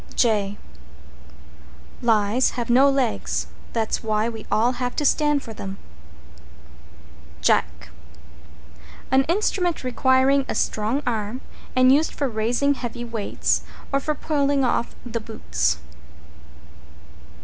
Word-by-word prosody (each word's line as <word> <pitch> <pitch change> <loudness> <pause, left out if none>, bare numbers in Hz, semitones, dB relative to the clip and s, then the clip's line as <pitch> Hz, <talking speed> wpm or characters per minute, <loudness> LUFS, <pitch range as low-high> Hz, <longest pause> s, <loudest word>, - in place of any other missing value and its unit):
J 205 -4 +1 1.4
Lies 225 +1 +3
have 240 -1 -1
no 265 +3 +6
legs 265 -5 0 0.3
That's 225 -2 -1
why 215 +1 0
we 225 -2 -9
all 230 +3 +3
have 245 0 -2
to 295 - -1
stand 295 0 +2
for 225 - -8
them. 195 -2 -7 1.6
=JACK= - - +1 1.2
An 265 0 +4
instrument 355 -1 0
requiring 260 +2 +3
a - - -2
strong 220 +7 0
arm, 225 +1 -2 0.3
and 255 0 +6
used 300 +4 +2
for 280 - 0
raising 240 +5 +1
heavy 240 -2 -5
weights, 225 -3 -1 0.3
or 275 - +3
for 305 +2 -2
pulling 280 -2 +1
off 235 -1 -1
the 235 -1 -3
boots. 75 - -1
245 Hz, 115 wpm, -23 LUFS, 220-275 Hz, 1.6 s, no